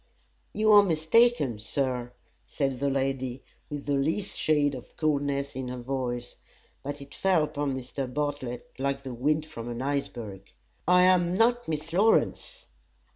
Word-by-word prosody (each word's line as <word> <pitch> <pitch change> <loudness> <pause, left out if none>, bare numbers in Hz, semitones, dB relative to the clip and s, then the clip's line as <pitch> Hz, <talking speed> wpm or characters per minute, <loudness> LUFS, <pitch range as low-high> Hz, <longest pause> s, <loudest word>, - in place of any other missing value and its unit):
"You 215 0 +2
are 205 -1 +9
mistaken, 160 - +3
Sir," 125 +1 -2 0.3
said 135 -3 -2
the 140 +1 +1
lady, 135 -1 -2 0.3
with 145 -1 -5
the 145 - 0
least 160 +9 -1
shade 145 -2 +2
of 125 -2 -10
coldness 140 -3 0
in 130 -1 -4
her 125 0 -5
voice, 120 -1 -4 0.4
but 145 +1 -6
it 140 - -11
fell 185 -5 +2
upon 145 -3 -2
Mr. 130 0 -5
Bartlett 140 -3 -3
like 140 0 -1
the 130 -2 -6
wind 150 +6 0
from 120 -6 -7
an 120 +1 -4
iceberg 120 -8 -4 0.4
"I 180 0 +6
am 180 -1 +4
not 240 +2 +3
Miss 155 +1 -4
Lawrence." 225 - +2
140 Hz, 150 wpm, -28 LUFS, 130-160 Hz, 0.4 s, are